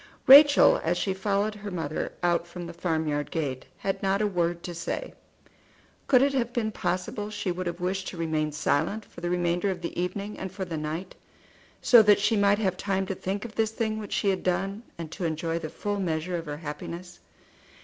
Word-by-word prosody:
Rachel, 285 Hz, +2 st, +8 dB
as 175 Hz, +2 st, +1 dB
she 190 Hz, -, 0 dB
followed 200 Hz, +2 st, 0 dB
her 210 Hz, 0 st, -7 dB
mother 160 Hz, -5 st, -3 dB
out 175 Hz, -1 st, +2 dB
from 175 Hz, 0 st, -7 dB
the 170 Hz, -, -7 dB
farmyard 160 Hz, -4 st, -1 dB
gate, 140 Hz, -6 st, -3 dB
had 195 Hz, -, -2 dB
not 195 Hz, 0 st, +1 dB
a 215 Hz, -, +2 dB
word 175 Hz, -3 st, -1 dB
to 175 Hz, -, -5 dB
say. 170 Hz, -, -4 dB, 0.9 s
Could 255 Hz, -1 st, +6 dB
it 280 Hz, 0 st, +2 dB
have 240 Hz, -3 st, 0 dB
been 225 Hz, -3 st, -1 dB
possible 185 Hz, +3 st, -3 dB
she 210 Hz, -3 st, -3 dB
would 180 Hz, +1 st, -4 dB
have 170 Hz, +1 st, -4 dB
wished 190 Hz, +2 st, -2 dB
to 180 Hz, -, -6 dB
remain 155 Hz, -2 st, -1 dB
silent 155 Hz, +8 st, 0 dB
for -, -, -13 dB
the 175 Hz, -, -2 dB
remainder 175 Hz, +2 st, +1 dB
of 180 Hz, -2 st, -3 dB
the 170 Hz, -, -4 dB
evening 200 Hz, +3 st, -4 dB
and 190 Hz, -1 st, -5 dB
for 190 Hz, 0 st, -4 dB
the 170 Hz, -2 st, -5 dB
night, 155 Hz, +4 st, -4 dB, 0.7 s
so 240 Hz, -3 st, +8 dB
that 210 Hz, -1 st, +5 dB
she 210 Hz, +2 st, +2 dB
might 200 Hz, 0 st, +4 dB
have 190 Hz, -4 st, 0 dB
time 195 Hz, -1 st, -1 dB
to 195 Hz, -, -3 dB
think 195 Hz, +4 st, -4 dB
of 225 Hz, -, -8 dB
this 220 Hz, -1 st, +1 dB
thing 220 Hz, -1 st, -2 dB
which 210 Hz, -2 st, -6 dB
she 200 Hz, -, +1 dB
had 190 Hz, -1 st, 0 dB
done, 195 Hz, +3 st, -1 dB, 0.2 s
and 165 Hz, -2 st, -7 dB
to 180 Hz, -, -6 dB
enjoy 165 Hz, 0 st, -1 dB
the 155 Hz, -, -5 dB
full 205 Hz, +4 st, -3 dB
measure 170 Hz, -1 st, -1 dB
of 165 Hz, -2 st, -4 dB
her 145 Hz, 0 st, -4 dB
happiness. 170 Hz, +3 st, -7 dB
185 Hz, 210 wpm, -27 LUFS, 170-205 Hz, 0.9 s, Rachel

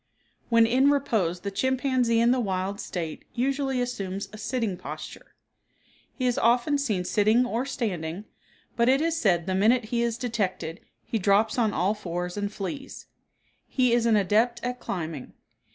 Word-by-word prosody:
When 230 Hz, -1 st, +5 dB
in 260 Hz, +4 st, +4 dB
repose 210 Hz, -12 st, +1 dB
the 200 Hz, -, -4 dB
chimpanzee 255 Hz, +1 st, +1 dB
in 235 Hz, +1 st, +4 dB
the 255 Hz, -, +2 dB
wild 195 Hz, -2 st, -2 dB
state 165 Hz, -4 st, -5 dB
usually 270 Hz, +1 st, 0 dB
assumes 200 Hz, -6 st, -3 dB
a -, -, -8 dB
sitting 225 Hz, -3 st, -1 dB
posture. -, -, -9 dB, 0.8 s
He 255 Hz, -, -2 dB
is 250 Hz, +1 st, +1 dB
often 245 Hz, +5 st, +3 dB
seen 215 Hz, -10 st, 0 dB
sitting 215 Hz, +6 st, +3 dB
or 245 Hz, +2 st, -2 dB
standing, 185 Hz, -, -3 dB, 0.5 s
but 235 Hz, +1 st, +3 dB
it 265 Hz, +1 st, +4 dB
is 330 Hz, +1 st, 0 dB
said 175 Hz, -5 st, +2 dB
the 190 Hz, -, -1 dB
minute 220 Hz, +5 st, +3 dB
he 235 Hz, -, +2 dB
is 235 Hz, -1 st, 0 dB
detected 195 Hz, -9 st, -2 dB, 0.3 s
he 225 Hz, -, -2 dB
drops 205 Hz, +5 st, +2 dB
on 220 Hz, -3 st, +2 dB
all 190 Hz, +3 st, +1 dB
fours 180 Hz, -3 st, -4 dB
and 205 Hz, 0 st, -2 dB
flees. 270 Hz, +8 st, -6 dB, 0.6 s
He 250 Hz, -3 st, +2 dB
is 235 Hz, -1 st, +3 dB
an 225 Hz, -, +4 dB
adept 220 Hz, +4 st, +2 dB
at 250 Hz, 0 st, -3 dB
climbing. 160 Hz, -, -5 dB
225 Hz, 165 wpm, -26 LUFS, 195-250 Hz, 0.8 s, When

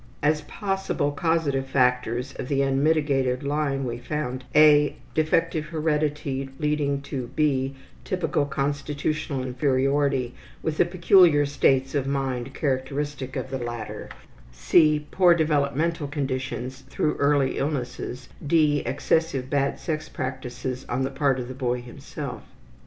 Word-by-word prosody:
As 150 Hz, +1 st, +3 dB
possible 195 Hz, -3 st, -2 dB
causative 145 Hz, -3 st, 0 dB
factors 125 Hz, -1 st, +1 dB
of -, -, -4 dB
the 140 Hz, 0 st, +1 dB
unmitigated 135 Hz, -2 st, +1 dB
lying 140 Hz, -1 st, -1 dB
we 120 Hz, -1 st, -4 dB
found 130 Hz, -1 st, -4 dB
(a) 150 Hz, -1 st, +6 dB, 0.2 s
defective 155 Hz, 0 st, +1 dB
heredity 150 Hz, -3 st, -1 dB
leading 150 Hz, -2 st, 0 dB
to 135 Hz, -3 st, -4 dB
(b) 135 Hz, -3 st, +1 dB, 0.3 s
typical 180 Hz, -6 st, 0 dB
constitutional 145 Hz, 0 st, -2 dB
inferiority 135 Hz, 0 st, +1 dB, 0.3 s
with 155 Hz, -1 st, -2 dB
the -, -, +5 dB
peculiar 175 Hz, -3 st, +5 dB
states 135 Hz, -1 st, +2 dB
of 140 Hz, -2 st, 0 dB
mind 135 Hz, -2 st, -2 dB
characteristic 135 Hz, 0 st, -2 dB
of -, -, -4 dB
the 135 Hz, -, -2 dB
latter, 120 Hz, -2 st, -6 dB, 0.4 s
(c) 150 Hz, -, +3 dB
poor 180 Hz, -2 st, +5 dB
developmental 150 Hz, 0 st, +1 dB
conditions 130 Hz, -2 st, -3 dB
through 150 Hz, -, 0 dB
early 140 Hz, -2 st, +2 dB
illnesses; 130 Hz, -3 st, -3 dB, 0.2 s
(d) 150 Hz, -1 st, +3 dB
excessive 135 Hz, +1 st, 0 dB
bad 140 Hz, -1 st, +1 dB
sex 155 Hz, -1 st, -3 dB
practices 130 Hz, -1 st, -4 dB
on 130 Hz, -, 0 dB
the 135 Hz, -, -2 dB
part 135 Hz, -1 st, +1 dB
of 120 Hz, -, -4 dB
the 130 Hz, -, -6 dB
boy 125 Hz, -2 st, -1 dB
himself. 120 Hz, -1 st, -7 dB
140 Hz, 125 wpm, -25 LUFS, 130-150 Hz, 0.4 s, a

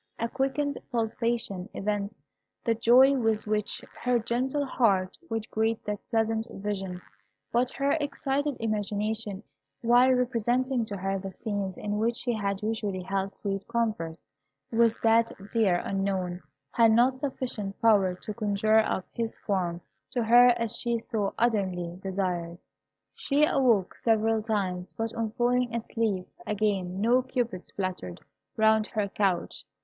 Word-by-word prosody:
A 230 Hz, -, -1 dB
quickened 275 Hz, +3 st, -1 dB
pulsation 230 Hz, -4 st, -1 dB
evinced 205 Hz, 0 st, -2 dB, 0.5 s
the 230 Hz, -, +2 dB
joy 245 Hz, +4 st, +6 dB
with 225 Hz, -4 st, +1 dB
which 210 Hz, -1 st, -2 dB, 0.2 s
her 250 Hz, 0 st, +2 dB
gentle 255 Hz, +5 st, -1 dB
heart 195 Hz, -8 st, +2 dB
would 225 Hz, -1 st, -3 dB
greet 220 Hz, +1 st, 0 dB
that 210 Hz, -1 st, -2 dB
pleasant 225 Hz, 0 st, 0 dB
vision; 195 Hz, -4 st, -4 dB, 0.5 s
but 245 Hz, +1 st, +2 dB
her 280 Hz, 0 st, 0 dB
excited 285 Hz, 0 st, -1 dB
imagination, 210 Hz, -1 st, -2 dB, 0.4 s
while 245 Hz, +2 st, +6 dB
representing 250 Hz, 0 st, +1 dB
to 205 Hz, -2 st, -5 dB
her 195 Hz, +1 st, -1 dB
the 195 Hz, 0 st, -5 dB
scenes 200 Hz, -1 st, -4 dB
in 210 Hz, 0 st, -2 dB
which 230 Hz, +2 st, +1 dB
she 245 Hz, -2 st, -1 dB
had 200 Hz, -2 st, -2 dB
usually 210 Hz, -4 st, -2 dB
held 195 Hz, +1 st, -2 dB
sweet 195 Hz, -1 st, -3 dB
converse 215 Hz, -9 st, -1 dB, 0.5 s
with 230 Hz, -1 st, +3 dB
that 230 Hz, 0 st, +4 dB, 0.2 s
dear 215 Hz, -6 st, +3 dB
Unknown, 190 Hz, -2 st, -1 dB, 0.3 s
had 230 Hz, -1 st, +5 dB
not 250 Hz, +3 st, +4 dB
sufficient 245 Hz, -8 st, -4 dB
power 200 Hz, -5 st, +4 dB
to 210 Hz, +3 st, -7 dB
conjure 215 Hz, 0 st, +2 dB
up 190 Hz, -4 st, 0 dB
his 230 Hz, -1 st, -3 dB
form 180 Hz, -4 st, -2 dB, 0.3 s
to 250 Hz, -2 st, -1 dB
her 240 Hz, +2 st, +7 dB
as 230 Hz, -1 st, -2 dB
she 235 Hz, 0 st, 0 dB
so 220 Hz, -3 st, -2 dB
ardently 185 Hz, -7 st, 0 dB
desired. 180 Hz, -3 st, -2 dB, 0.6 s
She 290 Hz, +1 st, +2 dB
awoke 240 Hz, -10 st, +2 dB
several 225 Hz, -1 st, +2 dB
times, 190 Hz, -5 st, -2 dB
but 225 Hz, 0 st, -3 dB
on 230 Hz, -1 st, -2 dB
falling 245 Hz, 0 st, +1 dB
asleep 220 Hz, -5 st, -1 dB, 0.2 s
again 195 Hz, -3 st, -1 dB
no 240 Hz, +4 st, +4 dB
cupids 245 Hz, -7 st, -3 dB
fluttered 185 Hz, -, -4 dB, 0.4 s
round 220 Hz, 0 st, +4 dB
her 210 Hz, -3 st, -1 dB
couch. 195 Hz, -3 st, -1 dB
220 Hz, 140 wpm, -28 LUFS, 195-235 Hz, 0.6 s, her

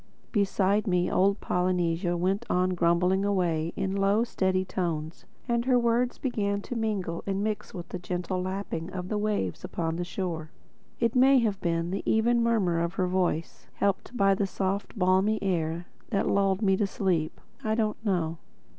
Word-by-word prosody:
Beside 200 Hz, 0 st, +2 dB
me 180 Hz, -2 st, +1 dB
old 195 Hz, +2 st, +3 dB
Polynesia 175 Hz, -1 st, 0 dB
went 190 Hz, +3 st, 0 dB
on 185 Hz, +1 st, +2 dB
grumbling 180 Hz, +2 st, +2 dB
away 170 Hz, -5 st, 0 dB
in 190 Hz, 0 st, -1 dB
low 200 Hz, +3 st, +3 dB
steady 190 Hz, -5 st, 0 dB
tones; 165 Hz, -4 st, -3 dB, 0.2 s
and 235 Hz, -1 st, +1 dB
her 255 Hz, -1 st, +4 dB
words 240 Hz, +1 st, +1 dB
began 200 Hz, -6 st, -1 dB
to 245 Hz, -, -6 dB
mingle 205 Hz, -7 st, -2 dB
and 195 Hz, 0 st, -1 dB
mix 215 Hz, -1 st, -3 dB
with 175 Hz, -3 st, -8 dB
the 180 Hz, -, -5 dB
gentle 180 Hz, +1 st, -3 dB
lapping 185 Hz, -3 st, -4 dB
of 180 Hz, 0 st, -5 dB
the 210 Hz, -, -1 dB
waves 205 Hz, -, -1 dB
upon 165 Hz, -1 st, -2 dB
the 175 Hz, -, -1 dB
shore. 170 Hz, -3 st, -4 dB, 0.5 s
It 230 Hz, -1 st, +2 dB
may 265 Hz, +2 st, +6 dB
have 210 Hz, -4 st, -1 dB
been 165 Hz, 0 st, 0 dB
the 195 Hz, -, -2 dB
even 235 Hz, +2 st, +3 dB
murmur 210 Hz, -8 st, +2 dB
of 170 Hz, +2 st, -1 dB
her 185 Hz, -, +1 dB
voice, 180 Hz, -3 st, -1 dB
helped 200 Hz, +5 st, -1 dB
by 195 Hz, -2 st, +4 dB
the 195 Hz, +1 st, 0 dB
soft 195 Hz, +1 st, -2 dB
and -, -, -10 dB
balmy 190 Hz, +4 st, +3 dB
air, 170 Hz, -2 st, -1 dB, 0.2 s
that 200 Hz, -4 st, 0 dB
lulled 195 Hz, +1 st, +2 dB
me 195 Hz, -1 st, +4 dB
to 205 Hz, -, +1 dB
sleep. 175 Hz, -6 st, -1 dB, 0.2 s
I 220 Hz, 0 st, +1 dB
don't 220 Hz, -1 st, -1 dB
know. 170 Hz, -6 st, 0 dB
190 Hz, 175 wpm, -28 LUFS, 175-210 Hz, 0.5 s, may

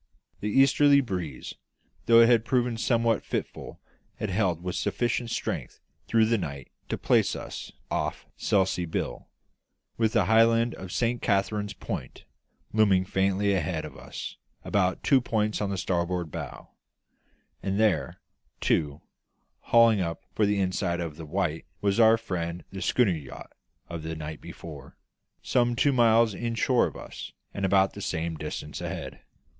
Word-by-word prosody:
The 105 Hz, -, -2 dB
easterly 140 Hz, +4 st, +5 dB
breeze, 90 Hz, -, -4 dB, 0.5 s
though 115 Hz, 0 st, +8 dB
it 115 Hz, -, +7 dB
had 115 Hz, -2 st, +4 dB
proved 120 Hz, -2 st, 0 dB
somewhat 115 Hz, -2 st, +2 dB
fitful, -, -, -5 dB, 0.4 s
had 110 Hz, -, -3 dB
held 90 Hz, -4 st, 0 dB
with 90 Hz, -1 st, -3 dB
sufficient 120 Hz, 0 st, -1 dB
strength -, -, -4 dB, 0.3 s
through 115 Hz, -1 st, +4 dB
the 115 Hz, 0 st, +2 dB
night 70 Hz, -6 st, -6 dB, 0.2 s
to -, -, -1 dB
place -, -, +2 dB
us -, -, -7 dB, 0.2 s
off -, -, -2 dB
Selsey 95 Hz, -3 st, +1 dB
Bill, -, -, -3 dB, 0.7 s
with 110 Hz, -1 st, +1 dB
the 95 Hz, -, +3 dB
high 110 Hz, +3 st, +5 dB
land 115 Hz, +1 st, +2 dB
of 95 Hz, -1 st, -8 dB
Saint 120 Hz, +3 st, 0 dB
Catherine's 105 Hz, 0 st, 0 dB
Point -, -, -6 dB, 0.5 s
looming 100 Hz, -4 st, +4 dB
faintly 95 Hz, +1 st, +1 dB
ahead 80 Hz, -3 st, -1 dB
of -, -, -10 dB
us -, -, -8 dB, 0.3 s
about 95 Hz, -2 st, +1 dB
two 135 Hz, -2 st, +4 dB
points 110 Hz, -3 st, -1 dB
on 100 Hz, -, -1 dB
the 100 Hz, -, -2 dB
starboard 85 Hz, -2 st, -1 dB
bow; -, -, -7 dB, 0.9 s
and 100 Hz, +1 st, -1 dB
there, 105 Hz, -8 st, +1 dB, 0.4 s
too, 75 Hz, -2 st, 0 dB, 0.6 s
hauling 115 Hz, -3 st, +5 dB
up 85 Hz, -2 st, -3 dB
for 105 Hz, -, +2 dB
the 100 Hz, 0 st, +1 dB
inside 90 Hz, -2 st, 0 dB
of 85 Hz, -3 st, -4 dB
the 80 Hz, 0 st, -9 dB
Wight, 85 Hz, -1 st, -2 dB
was 100 Hz, +1 st, +1 dB
our 115 Hz, 0 st, +7 dB
friend 90 Hz, -6 st, -4 dB
the 95 Hz, 0 st, -6 dB
schooner 120 Hz, -3 st, +3 dB
yacht 75 Hz, -6 st, -7 dB, 0.3 s
of 85 Hz, -2 st, -6 dB
the 80 Hz, +1 st, -5 dB
night 80 Hz, 0 st, -7 dB
before, 75 Hz, -5 st, -10 dB, 0.5 s
some 120 Hz, -1 st, +2 dB
two 140 Hz, +3 st, +3 dB
miles 115 Hz, -2 st, +4 dB
inshore 120 Hz, +3 st, +1 dB
of -, -, -9 dB
us -, -, -9 dB, 0.2 s
and 100 Hz, -1 st, -1 dB
about 95 Hz, 0 st, +3 dB
the 100 Hz, -, -8 dB
same 80 Hz, -2 st, -2 dB
distance 75 Hz, -1 st, -6 dB
ahead. -, -, -6 dB
100 Hz, 155 wpm, -27 LUFS, 85-115 Hz, 0.9 s, though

